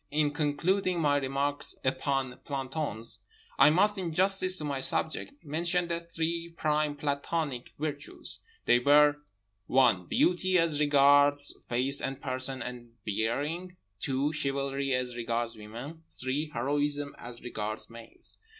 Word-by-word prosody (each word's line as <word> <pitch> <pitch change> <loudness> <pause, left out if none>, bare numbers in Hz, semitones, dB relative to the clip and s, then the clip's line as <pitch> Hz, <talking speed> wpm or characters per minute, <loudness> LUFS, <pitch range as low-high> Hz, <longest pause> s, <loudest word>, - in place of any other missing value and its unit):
In 150 0 +1
concluding 170 +5 0
my 145 -3 +3
remarks 140 +1 -1
upon 130 -1 0
plantons 135 -5 -2 0.4
I 140 - +8
must, 200 +6 +3
in 175 -3 -2
justice 185 +1 +3
to 155 - -3
my 140 -2 -2
subject, 160 - 0
mention 170 +4 0
the 170 0 -1
three 170 0 -3
prime 150 -1 +1
plantonic 145 -2 -2
virtues—they 150 - -2
were 145 +3 +5 0.5
(1) 120 -9 +3
beauty, 185 +1 +2
as 165 -3 +2
regards 145 0 +4
face 130 +4 +1
and 135 0 -3
person 130 0 -1
and 120 -1 -8
bearing, 145 - -2 0.2
(2) 140 +3 0
chivalry, 140 -2 -1
as 125 -1 -2
regards 115 0 -2
women, 120 +9 -9 0.2
(3) 140 +4 -1
heroism, 145 +3 0
as 120 0 -9
regards 110 -2 -4
males. 115 0 -8
145 Hz, 125 wpm, -29 LUFS, 130-160 Hz, 0.5 s, I